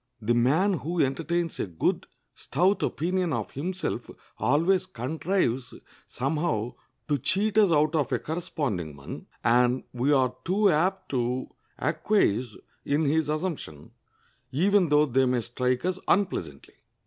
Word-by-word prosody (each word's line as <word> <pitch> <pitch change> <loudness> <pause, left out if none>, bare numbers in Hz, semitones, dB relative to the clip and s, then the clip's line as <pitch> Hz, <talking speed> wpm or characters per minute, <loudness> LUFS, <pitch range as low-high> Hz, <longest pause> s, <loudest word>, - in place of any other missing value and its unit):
The 115 +2 +1
man 150 +12 +3
who 170 +3 -3
entertains 165 +5 0
a - - -1
good, 85 -3 -1 0.3
stout 185 +8 +1
opinion 180 +1 0
of 115 -4 -3
himself 180 +7 -3 0.3
always 165 - +2
contrives 135 -3 -1 0.3
somehow 135 -4 -1 0.3
to 145 -2 +1
cheat 195 - 0
us 200 -5 +5
out 155 0 +3
of 150 -6 0
a - - +2
corresponding 135 - -3
one, 70 -1 -9 0.2
and 125 +2 +3
we 125 +4 +1
are 130 -3 +3
too 195 +3 +3
apt 185 +5 0
to 125 0 -1 0.3
acquiesce 125 - +1 0.3
in 150 +2 +1
his 155 +1 +1
assumption, 150 - -4 0.6
even 185 +4 +3
though 150 +1 +5
they 130 -1 +2
may 125 -1 +1
strike 125 +4 -1
us 185 0 -1
unpleasantly. 130 - -1
150 Hz, 135 wpm, -27 LUFS, 125-180 Hz, 0.6 s, us